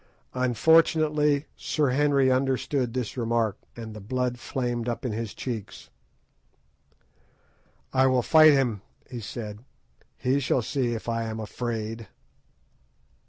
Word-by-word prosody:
Unfortunately 150 +3 +3
Sir 150 -4 0
Henry 140 -1 +3
understood 130 -1 0
this 125 -4 -3
remark, 115 -4 0 0.2
and 115 -2 -8
the 110 - -8
blood 125 +3 -2
flamed 120 -2 -2
up 120 +3 -4
into 115 -4 -2
his 115 -3 -5
cheeks. 115 -6 -6 2.0
"I 130 0 +4
will 130 -2 +2
fight 155 +1 +7
him," 125 -8 +1 0.3
he 125 - -5
said; 105 0 -7 0.5
"he 130 +2 +1
shall 130 -2 +1
see 120 -1 -1
if 115 - -7
I 115 0 -1
am 110 0 -4
afraid." 115 0 -4
125 Hz, 120 wpm, -26 LUFS, 115-135 Hz, 2.0 s, fight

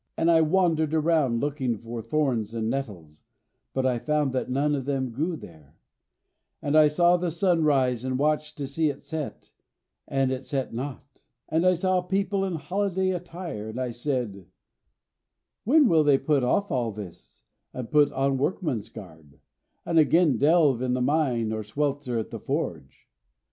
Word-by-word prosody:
And 165 +1 +3
I 165 -1 +5
wandered 160 -2 +2
around 155 -7 +2
looking 140 -5 -1
for 115 +1 -7
thorns 120 -6 -1
and 110 0 -1
nettles, 90 - -6 0.5
but 130 -1 -1
I 125 -2 +1
found 150 -1 0
that 130 - -2
none 140 +3 +1
of 135 -3 -2
them 135 -3 -1
grew 160 +9 -2
there; 80 - -14 0.8
and 145 +1 -1
I 155 -1 +7
saw 175 +4 +3
the 175 0 -1
sun 170 0 +1
rise 130 -5 +2
and 130 0 -1
watched 150 +1 0
to 145 - -3
see 150 +3 0
it 140 - -7
set, 160 -3 -6 0.6
but 135 -1 +1
it 130 0 -3
set 135 -2 -3
not. 135 +2 -7 0.3
And 165 +3 +2
I 185 - +5
saw 185 +1 +1
people 195 +2 -1
in 185 -3 -2
holiday 190 +3 -1
attire, 175 - -6
and 115 +3 -6
I 125 -1 -2
said, 120 - -3 1.2
'When 290 +4 +5
will 160 -5 +4
they 145 -2 +4
put 145 -2 +1
off 200 +10 +1
all 120 -4 0
this, 100 -10 -11 0.3
and 125 -3 -7
put 150 -1 +4
on 135 0 0
workman's 145 - -2
garb, 80 -8 -13 0.5
and 165 -1 +3
again 155 -3 +4
delve 150 -5 +4
in 125 -1 0
the 125 - -1
mine 125 -5 +1
or 110 - -3
swelter 135 +2 -2
at 110 - -4
the - - -6
forge?' 65 0 -4
140 Hz, 170 wpm, -26 LUFS, 120-160 Hz, 1.2 s, I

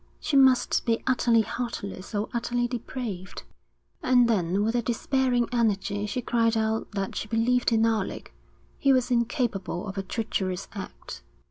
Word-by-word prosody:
She 305 - -2
must 265 -2 +4
be 230 -1 0
utterly 240 -3 +3
heartless 210 -4 -5
or 205 +1 0
utterly 240 0 0
depraved. 235 -6 -5 0.6
And 250 -1 +4
then 195 -3 +1
with 225 +2 +1
a 240 - +2
despairing 245 +1 +1
energy 210 -3 0
she 245 +4 -3
cried 230 -1 +2
out 220 0 -1
that 195 -1 -3
she - - -3
believed 235 +3 +2
in 225 0 +3
Alec; 220 -4 -2 0.5
he 275 - +4
was 255 -1 +1
incapable 230 -6 -1
of 195 0 -4
a - - 0
treacherous 190 -2 -3
act. 195 - -8
230 Hz, 150 wpm, -26 LUFS, 205-245 Hz, 0.6 s, must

